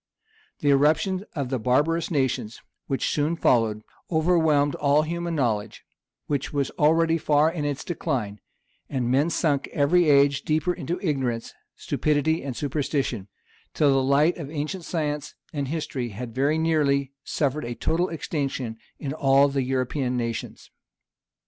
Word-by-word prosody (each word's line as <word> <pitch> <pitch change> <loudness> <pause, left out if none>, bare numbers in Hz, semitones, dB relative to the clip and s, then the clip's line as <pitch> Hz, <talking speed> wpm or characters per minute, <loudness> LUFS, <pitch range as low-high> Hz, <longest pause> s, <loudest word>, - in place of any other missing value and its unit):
The 145 - +3
irruption 160 +7 +2
of 140 -5 -2
the 130 -1 -1
barbarous 145 +8 +1
nations 130 - -1 0.3
which 135 - -1
soon 150 +3 0
followed, 115 -8 +2 0.3
overwhelmed 160 -3 +3
all 145 +1 +2
human 170 +1 -3
knowledge, 115 -7 -1 0.4
which 140 -2 -2
was 140 -2 -1
already 165 +2 +3
far 150 +1 +3
in 160 -4 -3
its 145 -1 -2
decline; 125 - -3 0.5
and 125 -3 -1
men 140 +5 +3
sunk 145 -5 0
every 155 +3 +3
age 140 -1 +4
deeper 160 +3 0
into 175 +1 -4
ignorance, 130 -8 -1 0.2
stupidity, 155 +2 0
and 135 -3 -4
superstition; 140 -7 -2 0.5
till 145 -2 +4
the 135 0 +3
light 140 +5 +3
of 150 -5 -6
ancient 155 +4 -4
science 150 -3 -3 0.2
and 140 -3 -2
history 140 -5 -3
had 115 +3 -7
very 140 +5 +1
nearly 145 -4 +1
suffered 145 0 -1
a 120 0 -4
total 175 +8 0
extinction 140 -7 -3 0.2
in 135 -2 -4
all 140 -1 +4
the 140 0 0
European 130 0 -1
nations. 115 -2 -5
145 Hz, 145 wpm, -25 LUFS, 130-160 Hz, 0.5 s, age